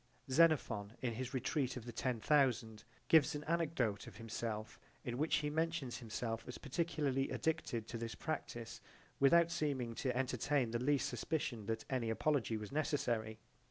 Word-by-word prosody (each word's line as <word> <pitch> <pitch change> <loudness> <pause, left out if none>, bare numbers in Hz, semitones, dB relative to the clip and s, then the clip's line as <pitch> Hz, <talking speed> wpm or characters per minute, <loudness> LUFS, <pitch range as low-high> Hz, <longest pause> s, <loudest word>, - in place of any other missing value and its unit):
Xenophon 130 -10 +3
in 120 -2 0
his 125 +2 -4
retreat 130 0 0
of 120 - -7
the 120 - -5
ten 120 0 -1
thousand 120 -6 +2 0.2
gives 155 -3 +6
an 150 - -4
anecdote 155 -10 0
of - - -10
himself 115 -1 -4 0.2
in 120 - -3
which 155 +2 +3
he 150 -1 0
mentions 160 -5 -1
himself 115 0 -3
as 125 - -6
particularly 140 -3 0
addicted 125 -8 -1
to 115 - -5
this 115 -1 -4
practise 120 -7 -4 0.4
without 170 +5 +6
seeming 140 -8 -1
to 125 +1 -1
entertain 130 0 +1
the 120 - 0
least 145 0 +2
suspicion 125 -3 -2
that 115 0 -2
any 125 -4 -1
apology 115 -1 +1
was 105 -1 -7
necessary. 120 -8 0
125 Hz, 160 wpm, -37 LUFS, 115-150 Hz, 0.4 s, gives